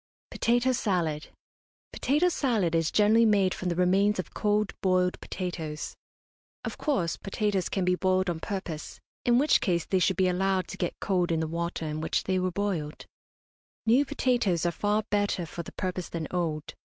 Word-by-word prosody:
POTATO 245 +2 +2
SALAD. 175 -10 -1 0.7
Potato 300 +7 +2
salad 225 - 0
is 165 -1 +2
generally 215 +2 +4
made 200 -4 +3
from 185 - -3
the 170 - -1
remains 195 +4 +3
of 185 - -5
cold 210 -1 +1
boiled 185 -1 +1
potatoes. 165 -5 -5 0.7
Of - - -5
course, 195 - 0
potatoes 195 -2 -1
can 190 -2 -1
be 180 - +3
boiled 185 +1 +1
on 170 -2 -1
purpose, 170 -5 -5 0.3
in 240 0 +4
which 290 +4 +4
case 170 -3 0
they 190 - +1
should 180 0 +2
be 190 -1 +3
allowed 185 +1 +1
to - - -7
get 175 - -3
cold 180 -3 +1
in 165 - +1
the 160 - 0
water 170 0 -3
in 155 0 -3
which 160 - 0
they 185 0 0
were 185 0 0
boiled. 175 -5 -3 0.8
New 240 +5 +5
potatoes 245 - +1
are 175 - +2
far 210 +4 0
better 205 -4 +1
for 170 +2 -6
the 170 - -10
purpose 185 -1 -3
than 165 -2 -4
old. 160 -4 -2
185 Hz, 175 wpm, -28 LUFS, 170-210 Hz, 0.8 s, New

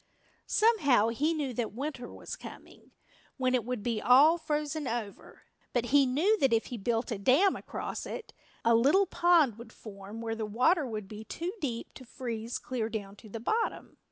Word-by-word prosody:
Somehow 285 - +4
he 285 +8 0
knew 295 -5 -2
that 230 -2 -3
winter 265 -2 -5
was - - -7
coming, - - -13 0.5
when 255 -1 +1
it 250 -3 +2
would 245 -2 -4
be 230 -2 -1
all 295 +7 +6
frozen 300 -1 -2
over. 225 -4 -6 0.3
But 240 0 -1
he 280 -2 +6
knew 355 +12 +2
that 270 - +3
if 225 -1 +2
he - - -3
built 230 +4 -1
a 215 - -2
dam 275 - +4
across - - -5
it, 480 - -7 0.3
a 230 - +5
little 280 +13 +4
pond 335 - +3
would 235 - -11
form 205 0 -10
where 225 -1 -3
the 225 -1 -3
water 265 - +2
would 215 -4 -5
be 215 +1 -8
too 340 - -5
deep 240 -6 -4
to 260 - -11
freeze 235 -2 -5
clear 235 -4 -3
down 205 -3 -5
to 220 - -14
the 225 - -6
bottom. 445 - -2
250 Hz, 185 wpm, -30 LUFS, 225-300 Hz, 0.5 s, all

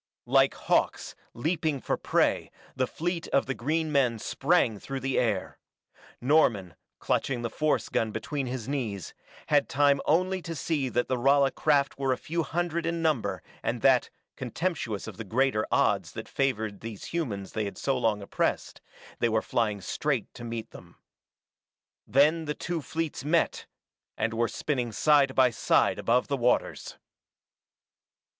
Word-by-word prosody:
Like - - +4
hawks, - - 0 0.2
leaping 155 +2 -1
for - - -1
prey, - - +1 0.3
the 130 -1 0
fleet 170 0 -3
of 140 - +2
the 135 - -2
green 155 +5 -1
men 130 -5 +2
sprang 110 0 +1
through 135 +5 -5
the 135 +1 0
air. 110 -6 -1 0.6
Norman, 120 - +2 0.2
clutching 125 -3 -1
the 115 - -2
force 155 0 0
gun 110 - 0
between 130 +6 -3
his 125 -3 -4
knees, 115 - -3 0.4
had - - +3
time 140 0 +3
only 185 +3 +2
to 165 -1 -6
see 145 -3 -1
that 120 0 0
the 130 - 0
Rala 135 +2 +4
craft 140 -3 +1
were 135 -1 +1
a 130 - +1
few 165 +2 -2
hundred 170 0 -2
in 165 0 -1
number 155 -8 0 0.2
and - - -2
that, - - +4 0.3
contemptuous 155 - -3
of - - -8
the 115 - -5
greater 115 +1 +1
odds - - +2
that - - -7
favored 110 -7 -1
these 110 -3 -8
humans 105 - -3
they 110 -1 -2
had 100 - -6
so 135 - 0
long 110 -5 0
oppressed, - - -2 0.4
they 120 - +2
were 110 0 +2
flying 105 -4 0
straight - - -2
to 120 - -10
meet 115 -1 -5
them. - - -14 1.1
Then 150 +7 +3
the 150 0 -3
two 175 -2 -3
fleets 160 -1 -4
met 160 +3 +1 0.5
and 115 +1 0
were 115 +1 +1
spinning 125 -5 -2
side 140 +2 +3
by 130 -2 +5
side 110 - +2
above 120 +2 +2
the 140 - -1
waters. 125 0 0
135 Hz, 160 wpm, -28 LUFS, 115-155 Hz, 1.1 s, by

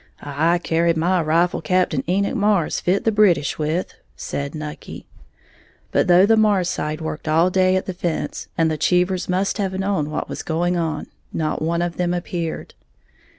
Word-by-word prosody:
"I 155 +5 +1
carried 165 -1 +1
my 175 +2 +2
rifle 165 +3 +1
Cap'n 170 -4 +1
Enoch 200 +5 +1
Marrs 205 -7 +1
fit 185 +3 +1
the 225 - +2
British 195 -10 +2
with," 155 +4 -1 0.2
said 140 +2 -5
Nucky. 150 -1 -8 0.9
But - - +2
though 180 +2 +6
the 225 +2 +4
Marrs 205 -5 +3
side 155 -3 -3
worked 160 0 -5
all 165 +4 +3
day 185 0 +3
at 185 - -1
the 185 - -4
fence, 175 -2 -3
and 160 -1 +2
the 155 - -3
Cheevers 180 +2 +1
must 190 +4 0
have 190 -2 -1
known 190 -6 -1
what 150 - -3
was - - -5
going 175 +2 -1
on, 160 -3 -2 0.3
not 155 -1 -2
one 170 +2 0
of 175 -1 -4
them 175 0 0
appeared. 170 -2 -4
175 Hz, 175 wpm, -21 LUFS, 160-185 Hz, 0.9 s, though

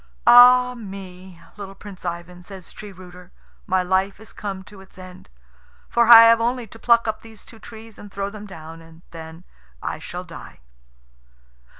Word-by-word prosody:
"Ah 250 +1 +7
me, 190 -5 -11 0.2
little 195 -1 -9
Prince 195 -2 -13
Ivan," 175 +1 -7
says 185 -1 -13
Tree 210 -1 -11
rooter, 180 -1 -15 0.4
"my 185 -2 0
life 190 +2 -1
is 220 - -15
come 195 -2 -7
to 195 0 -15
its 190 0 -19
end; 185 - -14 0.6
for 235 -1 +2
I 230 -1 +10
have 230 0 +5
only 240 +1 -2
to 225 +1 -16
pluck 235 -1 +2
up 220 0 -3
these 225 -2 -16
two 225 - -16
trees 220 0 -14
and 205 - -13
throw 200 +1 -5
them 210 0 -11
down, 165 -3 -12
and 165 +1 -18
then 160 +1 -11 0.4
I - - -6
shall - - -8
die." - - -13
195 Hz, 175 wpm, -21 LUFS, 180-225 Hz, 0.6 s, I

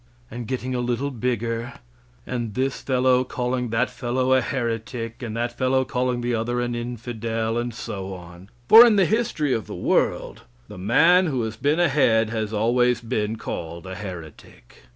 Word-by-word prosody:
A 120 - -6
getting 130 +2 -3
a 125 - -1
little 125 +3 -1
bigger, 120 -1 -2 0.5
and 120 -4 -4
this 135 +1 -1
fellow 130 -1 +2
calling 125 -1 -2
that 115 +3 0
fellow 130 +1 0
a 130 - +4
heretic, 115 -1 -4
and 115 -2 -5
that 120 0 -2
fellow 130 +1 +1
calling 125 -1 -1
the 120 0 -1
other 120 +2 -1
an 120 0 -1
infidel, 115 -1 -3
and 120 0 -3
so 95 -4 -6
on. 90 +2 -13 0.2
For 225 +2 +11
in 235 -3 +5
the 195 -2 +4
history 170 - 0
of 110 - -2
the - - -7
world, - - 0 0.3
the - - -10
man 170 - +4
who 130 -6 -1
has 110 0 -4
been 145 +3 +1
ahead 115 -10 +3
has 110 -2 -2
always 120 +3 +2
been 110 -2 -2
called 85 -5 -6
a 95 - -6
heretic. 85 -10 -10
120 Hz, 175 wpm, -23 LUFS, 110-130 Hz, 0.5 s, For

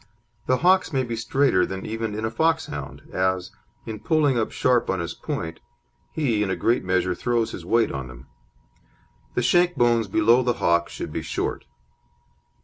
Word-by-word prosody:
The 130 - +3
hocks 185 +1 +3
may 135 -3 +1
be 120 -2 -4
straighter 120 -3 +2
than 95 0 -4
even 110 -1 -3
in 110 +1 -2
a 110 - -2
Foxhound, 160 - -1
as, 95 0 0 0.3
in 110 -1 -6
pulling 150 -2 +2
up 115 -2 0
sharp 125 -2 +1
on 95 - 0
his 85 - -3
point, 80 0 -5 0.5
he 125 -9 0
in 105 - 0
a 95 - 0
great 120 +2 +1
measure 90 0 +1
throws 120 +4 -1
his - - -8
weight 115 0 +2
on 70 -2 -5
them; 65 +1 -12 1.1
the - - +1
shank 175 0 +3
bones 120 -2 +2
below 110 +5 +4
the 125 -1 +1
hock 85 -4 +1
should - - -6
be - - -2
short. - - -3
115 Hz, 175 wpm, -24 LUFS, 95-130 Hz, 1.1 s, below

